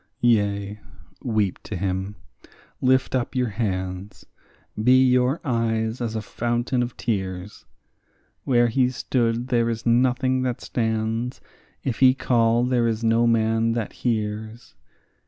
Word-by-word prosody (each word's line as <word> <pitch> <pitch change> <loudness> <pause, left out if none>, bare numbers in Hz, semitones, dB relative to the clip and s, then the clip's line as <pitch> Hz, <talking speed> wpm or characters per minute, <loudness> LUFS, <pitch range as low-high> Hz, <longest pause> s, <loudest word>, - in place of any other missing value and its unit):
Yea, 100 -3 +1 0.4
weep 105 -5 0
to 110 - -6
him, 95 +2 -3 0.7
lift 130 0 +2
up 130 -1 -1
your 125 -2 +1
hands; 95 -2 -4 0.6
be 130 +2 +6
your 125 +3 +2
eyes 115 -2 -1
as 115 -2 -2
a 110 - -3
fountain 120 +4 -1
of 120 -1 -4
tears; 95 -3 -4 0.8
Where 120 -2 +3
he 125 +2 +2
stood 120 -1 -1
there 115 -2 +2
is 115 0 -4
nothing 130 +2 +2
that 125 -2 -2
stands; 115 +1 -2 0.4
if 130 -4 -2
he 130 -1 +6
call, 115 -2 +2
there 125 -2 +2
is 115 0 -2
no 115 +1 +3
man 115 0 +2
that 115 -3 -3
hears. 110 0 -3
115 Hz, 130 wpm, -23 LUFS, 110-125 Hz, 0.8 s, be